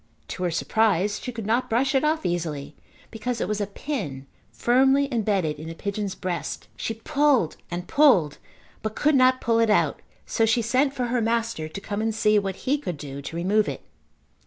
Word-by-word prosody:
To -, -, -6 dB
her 180 Hz, -, +1 dB
surprise 205 Hz, +3 st, +1 dB
she 250 Hz, -, -5 dB
could 225 Hz, -3 st, -6 dB
not 235 Hz, +4 st, +1 dB
brush 265 Hz, +5 st, +1 dB
it 270 Hz, -, +2 dB
off 310 Hz, +1 st, +1 dB
easily 155 Hz, -4 st, -3 dB, 0.4 s
because 235 Hz, +1 st, -3 dB
it -, -, -1 dB
was 210 Hz, 0 st, -1 dB
a 205 Hz, -, -1 dB
pin 195 Hz, -, -5 dB, 0.3 s
firmly 270 Hz, +3 st, +3 dB
embedded 195 Hz, -9 st, 0 dB
in 155 Hz, -, -7 dB
the 165 Hz, -, -6 dB
pigeon's 200 Hz, +1 st, -3 dB
breast. 180 Hz, -3 st, -4 dB
She 225 Hz, -, -3 dB
pulled 275 Hz, -, +2 dB
and 175 Hz, +1 st, -5 dB
pulled 205 Hz, -, +4 dB, 0.4 s
but 220 Hz, 0 st, -4 dB
could 305 Hz, +1 st, +2 dB
not 255 Hz, -1 st, +4 dB
pull 230 Hz, -1 st, +2 dB
it 230 Hz, -1 st, +3 dB
out 210 Hz, -, +2 dB, 0.2 s
so 225 Hz, -, 0 dB
she 225 Hz, +1 st, +3 dB
sent 260 Hz, +5 st, +2 dB
for 250 Hz, -, -1 dB
her 245 Hz, -, +2 dB
master 230 Hz, -7 st, -1 dB
to 195 Hz, -, -6 dB
come 205 Hz, +1 st, -4 dB
and 225 Hz, -1 st, -1 dB
see 215 Hz, -1 st, +4 dB
what 195 Hz, -2 st, -5 dB
he 285 Hz, +3 st, +2 dB
could 180 Hz, -, -4 dB
do 140 Hz, -1 st, -7 dB
to 140 Hz, +4 st, -7 dB
remove 200 Hz, +5 st, +2 dB
it. -, -, -6 dB
215 Hz, 200 wpm, -25 LUFS, 180-250 Hz, 0.4 s, pulled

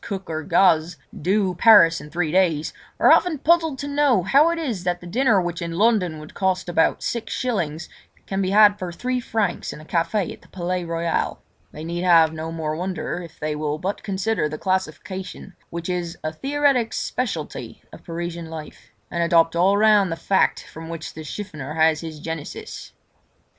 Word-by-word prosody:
Cook 190 Hz, -4 st, -5 dB
or 155 Hz, 0 st, -2 dB
Gaze, 165 Hz, 0 st, +3 dB, 0.2 s
"do" 190 Hz, +2 st, +1 dB
Paris 175 Hz, -6 st, +6 dB
in 150 Hz, -, -11 dB
three 165 Hz, -1 st, -1 dB
days, 170 Hz, -4 st, +1 dB, 0.3 s
are -, -, +6 dB
often 355 Hz, -4 st, +4 dB
puzzled 320 Hz, 0 st, +2 dB
to 280 Hz, -, -5 dB
know 285 Hz, -8 st, +2 dB
how 285 Hz, -, +5 dB
it 335 Hz, -, -1 dB
is 245 Hz, -, -3 dB
that 175 Hz, -1 st, -1 dB
the 180 Hz, -, -13 dB
dinner 225 Hz, +3 st, +2 dB
which 175 Hz, -1 st, -3 dB
in 170 Hz, 0 st, -4 dB
London 200 Hz, -7 st, +2 dB
would 155 Hz, +1 st, -11 dB
cost 185 Hz, -1 st, 0 dB
about 170 Hz, -2 st, +1 dB
six 235 Hz, -2 st, -3 dB
shillings, 170 Hz, -11 st, -2 dB, 0.4 s
can 195 Hz, 0 st, -2 dB
be 185 Hz, -, 0 dB
had 205 Hz, 0 st, +6 dB
for 180 Hz, -2 st, -4 dB
three 250 Hz, +8 st, -2 dB
francs 220 Hz, -5 st, -2 dB
in -, -, -9 dB
a 155 Hz, -, -13 dB
café 175 Hz, +4 st, -1 dB
in -, -, -16 dB
the -, -, -20 dB
Palais 180 Hz, 0 st, -3 dB
Royal. 165 Hz, 0 st, -2 dB, 0.3 s
They 155 Hz, -, -9 dB
need 170 Hz, +1 st, -3 dB
have 165 Hz, -3 st, +5 dB
no 160 Hz, +1 st, -5 dB
more 155 Hz, -2 st, -3 dB
wonder 180 Hz, 0 st, -3 dB
if 170 Hz, -2 st, -12 dB
they 150 Hz, 0 st, -2 dB
will 150 Hz, 0 st, -2 dB
but 190 Hz, +5 st, -3 dB
consider 195 Hz, -4 st, -1 dB
the 155 Hz, -, -5 dB
classification 185 Hz, +1 st, -4 dB
which 170 Hz, 0 st, -5 dB
is 175 Hz, -2 st, -3 dB
a 155 Hz, 0 st, -3 dB
theoretic 275 Hz, -, +1 dB
speciality 250 Hz, -2 st, -4 dB
of -, -, -12 dB
Parisian 170 Hz, -1 st, -5 dB
life, 160 Hz, -2 st, -10 dB, 0.2 s
and 170 Hz, -, -1 dB
adopt 170 Hz, -1 st, +3 dB
all 190 Hz, +4 st, +3 dB
round 210 Hz, -3 st, +4 dB
the -, -, -1 dB
fact 190 Hz, +3 st, +1 dB
from 160 Hz, +1 st, -10 dB
which 165 Hz, -1 st, -6 dB
the 155 Hz, -, -8 dB
chiffonier 155 Hz, -4 st, -6 dB
has 160 Hz, -1 st, +3 dB
his 160 Hz, -2 st, -7 dB
genesis. 160 Hz, -1 st, -7 dB
175 Hz, 190 wpm, -22 LUFS, 160-205 Hz, 0.4 s, Paris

